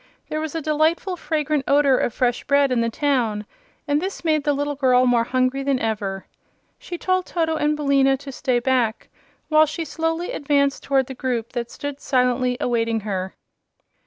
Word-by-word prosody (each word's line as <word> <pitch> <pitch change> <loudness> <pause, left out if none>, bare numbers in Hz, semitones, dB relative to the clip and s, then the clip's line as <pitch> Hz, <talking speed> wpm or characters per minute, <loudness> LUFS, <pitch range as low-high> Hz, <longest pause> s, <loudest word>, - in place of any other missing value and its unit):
There 310 - -2
was 315 0 -5
a 325 - -3
delightful 315 +5 +1
fragrant 305 -4 -1
odor 280 -1 +4
of 240 - 0
fresh 245 +1 0
bread 280 -1 +3
in 245 -2 +2
the 230 - +1
town, 230 -5 0 0.4
and 290 +1 +1
this 380 -1 -5
made 310 -2 +2
the 290 - +3
little 290 +1 -1
girl 255 -2 +3
more 240 -2 +3
hungry 255 +2 0
than 275 -1 +1
ever. 205 -4 -3 0.5
She 350 - -7
told 370 +1 0
Toto 325 -2 0
and 300 -1 +1
Billina 275 -2 +3
to 275 0 -9
stay 255 -1 0
back 240 -3 0 0.4
while 310 0 +5
she 325 +2 -4
slowly 325 +3 -2
advanced 280 -1 +1
toward 270 -1 +1
the 265 - -7
group 245 -3 -3
that 240 -1 -4
stood 285 -1 -6
silently 250 -1 +1
awaiting 230 -2 0
her. 190 -2 -4
275 Hz, 180 wpm, -22 LUFS, 245-300 Hz, 0.5 s, while